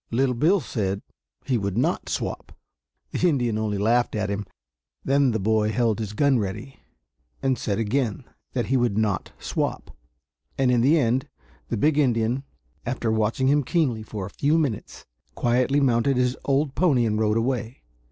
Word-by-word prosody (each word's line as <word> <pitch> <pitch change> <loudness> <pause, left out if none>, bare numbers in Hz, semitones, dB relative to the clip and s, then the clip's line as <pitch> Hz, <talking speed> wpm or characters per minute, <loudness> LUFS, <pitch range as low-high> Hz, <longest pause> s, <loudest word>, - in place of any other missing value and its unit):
Little 125 +2 +1
Bill 160 +11 +3
said 100 - -3 0.4
he 125 -3 +1
would 100 0 -2
not 125 - 0
swap. - - -4 0.5
The 180 - +2
Indian 120 -7 0
only 105 -2 -1
laughed 115 +4 +2
at 105 -1 -1
him. 100 0 -3 0.6
Then 140 0 +3
the 110 - 0
boy 105 +1 +2
held 115 -1 +1
his 105 -2 -4
gun 135 +2 +3
ready, 105 +7 -5 0.6
and 135 -1 +2
said 105 -4 -2
again 115 -1 -1 0.3
that - - 0
he 135 - +1
would 120 -5 +1
not 105 -3 0
swap; - - -3 0.6
and 130 -2 +3
in 120 -2 +3
the 145 +7 +4
end 130 -2 +1 0.4
the - - -2
big 150 +6 +2
Indian, 120 -2 +1 0.4
after 120 -2 -2
watching 110 +4 +1
him 145 +2 +4
keenly 130 -7 0
for 105 -2 -6
a 100 - -9
few 150 +3 +1
minutes, 140 -10 -3 0.3
quietly 125 +4 +2
mounted 130 0 +2
his 125 0 +1
old 140 0 +1
pony 140 -10 +3
and 105 -1 0
rode 110 0 +2
away. 120 - -2
120 Hz, 170 wpm, -24 LUFS, 110-135 Hz, 0.6 s, the